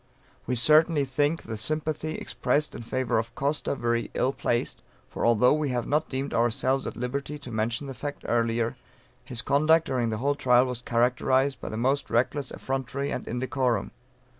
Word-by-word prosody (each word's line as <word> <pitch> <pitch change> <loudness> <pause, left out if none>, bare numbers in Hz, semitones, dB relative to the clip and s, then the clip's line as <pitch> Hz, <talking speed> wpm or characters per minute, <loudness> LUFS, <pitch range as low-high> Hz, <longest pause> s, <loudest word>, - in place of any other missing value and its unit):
We 125 - 0
certainly 150 +3 +5
think 145 +4 0
the 110 -1 -6
sympathy 155 +4 -2
expressed 150 +1 -1
in - - -7
favor 120 0 0
of 110 +1 -5
Costa 140 +1 -1
very 120 -2 -1
ill 130 - +1
placed, 120 -3 -1 0.3
for - - -1
although 120 +3 +5
we 150 -1 0
have 125 -2 -1
not 150 +2 0
deemed 135 +1 -3
ourselves 125 +3 +1
at - - -6
liberty 140 +4 -3
to 140 -4 -10
mention 115 +5 -1
the 135 - -6
fact 145 +2 -6
earlier, 115 0 0 0.5
his 115 -2 -4
conduct 155 +5 +4
during 120 -3 0
the 110 - -2
whole 140 +5 +1
trial 125 -3 +4
was 125 -2 -4
characterized 130 +3 +1
by - - -5
the 110 - -5
most 135 +4 0
reckless 130 +3 0
effrontery 135 +1 -3
and - - -4
indecorum. 125 -2 -1
130 Hz, 175 wpm, -27 LUFS, 120-145 Hz, 0.5 s, certainly